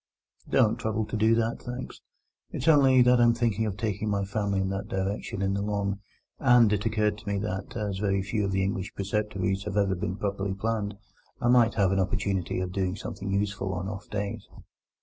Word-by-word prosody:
"Don't 110 Hz, +1 st, +3 dB
trouble 110 Hz, -1 st, -1 dB
to -, -, -5 dB
do 110 Hz, +1 st, +4 dB
that, 115 Hz, 0 st, -1 dB
thanks. 125 Hz, +1 st, -7 dB, 0.5 s
It's 130 Hz, -, -5 dB
only 135 Hz, -5 st, +6 dB
that 125 Hz, 0 st, +5 dB
I'm 120 Hz, 0 st, +5 dB
thinking 110 Hz, -2 st, 0 dB
of 100 Hz, -2 st, -4 dB
taking 105 Hz, -1 st, -2 dB
my 100 Hz, -1 st, 0 dB
family 100 Hz, -1 st, -1 dB
in 95 Hz, 0 st, 0 dB
that 100 Hz, +1 st, -3 dB
direction 100 Hz, +1 st, -3 dB
in 95 Hz, 0 st, +1 dB
the 100 Hz, -, -1 dB
Long, 100 Hz, -1 st, -1 dB, 0.4 s
and 120 Hz, -3 st, +5 dB
it 105 Hz, +2 st, 0 dB
occurred 105 Hz, -1 st, 0 dB
to 110 Hz, -, -17 dB
me 100 Hz, -, 0 dB
that, 95 Hz, +1 st, -4 dB
as 100 Hz, -3 st, -2 dB
very 100 Hz, -2 st, +1 dB
few 105 Hz, +2 st, -1 dB
of 100 Hz, -, -1 dB
the 95 Hz, 0 st, +1 dB
English 95 Hz, 0 st, -3 dB
preceptories 100 Hz, -1 st, -1 dB
have 105 Hz, -1 st, -3 dB
ever 100 Hz, -2 st, +3 dB
been 90 Hz, 0 st, -3 dB
properly 100 Hz, -1 st, -2 dB
planned, 105 Hz, -1 st, -2 dB, 0.4 s
I 120 Hz, -, +1 dB
might 120 Hz, -2 st, +5 dB
have 100 Hz, -3 st, +3 dB
an 95 Hz, -, +2 dB
opportunity 95 Hz, -1 st, -1 dB
of 90 Hz, -1 st, -3 dB
doing 95 Hz, -1 st, -1 dB
something 100 Hz, 0 st, -6 dB
useful 100 Hz, -1 st, -1 dB
on 90 Hz, +1 st, -3 dB
off 100 Hz, 0 st, -7 dB
days." 100 Hz, -1 st, -4 dB
100 Hz, 205 wpm, -27 LUFS, 95-110 Hz, 0.5 s, only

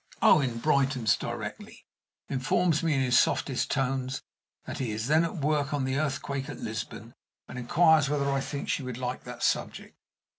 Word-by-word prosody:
Owen 130 Hz, -6 st, +5 dB
brightens 135 Hz, -4 st, +2 dB
directly, -, -, -7 dB, 0.4 s
informs 155 Hz, +5 st, +1 dB
me 165 Hz, -3 st, +1 dB
in 135 Hz, -, +2 dB
his 125 Hz, -2 st, +4 dB
softest 130 Hz, -3 st, +1 dB
tones 135 Hz, -1 st, -1 dB, 0.4 s
that -, -, -6 dB
he 130 Hz, -4 st, -2 dB
is 110 Hz, +1 st, -3 dB
then 155 Hz, +5 st, +4 dB
at 170 Hz, -, -3 dB
work 150 Hz, -1 st, 0 dB
on 135 Hz, -2 st, -1 dB
the 130 Hz, +1 st, 0 dB
Earthquake 140 Hz, -1 st, -2 dB
at 145 Hz, -, -7 dB
Lisbon, 110 Hz, +1 st, -6 dB, 0.3 s
and 125 Hz, -, -7 dB
inquires 155 Hz, +3 st, +4 dB
whether 145 Hz, -1 st, 0 dB
I 135 Hz, 0 st, 0 dB
think 140 Hz, +1 st, -5 dB
she -, -, 0 dB
would 125 Hz, -2 st, -5 dB
like 125 Hz, 0 st, -4 dB
that 125 Hz, -1 st, -7 dB
subject. -, -, -1 dB
135 Hz, 175 wpm, -28 LUFS, 125-145 Hz, 0.4 s, Owen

